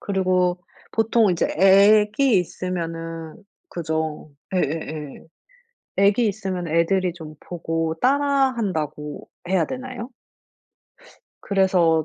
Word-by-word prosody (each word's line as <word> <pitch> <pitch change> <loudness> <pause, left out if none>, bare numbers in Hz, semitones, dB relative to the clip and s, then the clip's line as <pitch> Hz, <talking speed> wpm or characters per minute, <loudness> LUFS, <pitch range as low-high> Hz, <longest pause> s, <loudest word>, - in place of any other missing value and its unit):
그리고 185 -2 +1 0.3
보통 225 -1 +3
이제 170 - +1
애기 210 +5 +5
있으면은 165 -2 -5 0.3
그죠. 160 -2 -3 0.2
예예예 155 -3 -3 0.7
애기 205 +4 +3
있으면 190 -4 -4
애들이 175 +3 +1
좀 155 -3 -10
보고 165 -2 -3
따라 280 0 +3
한다고 155 -8 -4 0.2
해야 185 -4 +2
되나요? 255 -1 -6 1.3
그래서 180 -5 +2
185 Hz, 210 characters per minute, -22 LUFS, 165-210 Hz, 1.3 s, 애기